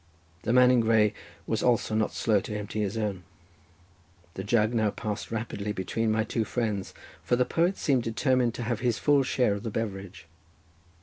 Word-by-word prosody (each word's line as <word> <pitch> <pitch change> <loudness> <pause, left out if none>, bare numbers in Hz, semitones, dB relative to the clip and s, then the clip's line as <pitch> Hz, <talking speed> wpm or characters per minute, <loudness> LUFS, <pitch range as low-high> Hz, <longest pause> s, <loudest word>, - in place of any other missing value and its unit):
The 115 - -1
man 125 0 +6
in 125 - +4
grey 110 -2 +3 0.3
was 110 -2 -1
also 120 -3 +1
not 110 0 +1
slow 110 -3 +2
to 105 +2 -5
empty 105 +1 -5
his 105 +2 -2
own. 105 -4 -2 1.1
The 95 - -5
jug 110 +2 +2
now 110 -2 +2
passed 105 0 -5
rapidly 110 -2 -3
between 110 +3 -1
my 110 0 +1
two 115 0 -1
friends, 110 -4 -3 0.3
for 85 +9 +1
the 125 +1 +2
poet 175 +7 +1
seemed 135 -5 +1
determined 120 +1 +1
to 120 - -4
have 115 -1 -2
his 120 -3 0
full 145 -1 +3
share 125 -4 +1
of 100 - -4
the 115 - -4
beverage. 100 -5 -5
110 Hz, 185 wpm, -27 LUFS, 105-120 Hz, 1.1 s, man